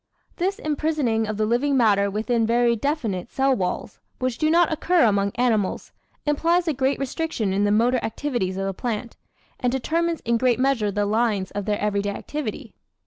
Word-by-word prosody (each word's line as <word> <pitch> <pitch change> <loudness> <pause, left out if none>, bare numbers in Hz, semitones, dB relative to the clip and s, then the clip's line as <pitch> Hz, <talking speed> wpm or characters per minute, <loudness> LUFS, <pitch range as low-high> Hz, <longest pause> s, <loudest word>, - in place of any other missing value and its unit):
This 380 +3 0
imprisoning 295 -7 0
of 215 -1 -3
the 215 - +1
living 260 +5 +1
matter 200 -4 +3
within 225 +3 0
very 235 0 +3
definite 230 - -2
cell 270 0 +2
walls 180 -4 -3 0.2
which 255 -2 -2
do 310 - +2
not 335 0 +4
occur 350 +3 +2
among 200 -3 +2
animals 225 -5 0 0.3
implies 335 +4 +2
a 315 - +2
great 265 +1 0
restriction 275 - -2
in 200 +1 +2
the 205 - +2
motor 240 +4 +3
activities 220 -7 -2
of 195 - -2
the 195 - -2
plant, 235 +2 -4 0.4
and 250 -2 +1
determines 330 +6 -1
in 235 0 0
great 250 -1 +2
measure 255 -6 +2
the 205 +1 0
lines 210 -3 0
of 205 -1 -4
their 210 -1 0
everyday 205 -1 0
activity. 295 +8 -5
240 Hz, 180 wpm, -23 LUFS, 210-285 Hz, 0.4 s, not